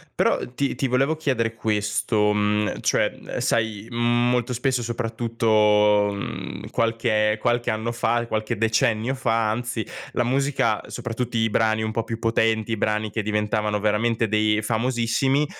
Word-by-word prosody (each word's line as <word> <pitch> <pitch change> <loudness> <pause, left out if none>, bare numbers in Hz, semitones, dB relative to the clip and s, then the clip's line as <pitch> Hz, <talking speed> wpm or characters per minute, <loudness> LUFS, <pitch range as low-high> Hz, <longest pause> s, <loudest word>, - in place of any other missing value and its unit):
Però - - +2 0.2
ti 140 +2 -1
ti 135 - -1
volevo 135 +5 +1
chiedere 125 -7 0
questo, 105 -1 0
mhmm, 105 0 0
cioè, - - +1
uhm, - - -7
sai 110 -1 -1
molto 120 +1 +1
spesso, 125 +1 0
soprattutto, 110 -3 +2
mhmm, 100 - -6
qualche 115 -2 +1
qualche 120 -1 +1
anno 110 +2 -2
fa, 120 0 0
qualche 110 +1 -2
decennio 115 +3 +1
fa 115 -4 +1
anzi, 120 0 -3 0.3
la 120 - +1
musica, 130 -3 +1
soprattutto 120 0 -4
i 115 0 +2
brani 110 0 +1
un 110 - -2
po' 115 +1 -1
più 115 0 -5
potenti, 115 -1 +1
i 115 - 0
brani 105 +1 0
che 110 - -2
diventavano 105 0 -1
veramente 110 +2 +1
dei 110 0 +2
famosissimi, 120 +5 +1
115 Hz, 145 wpm, -23 LUFS, 110-120 Hz, 0.3 s, Però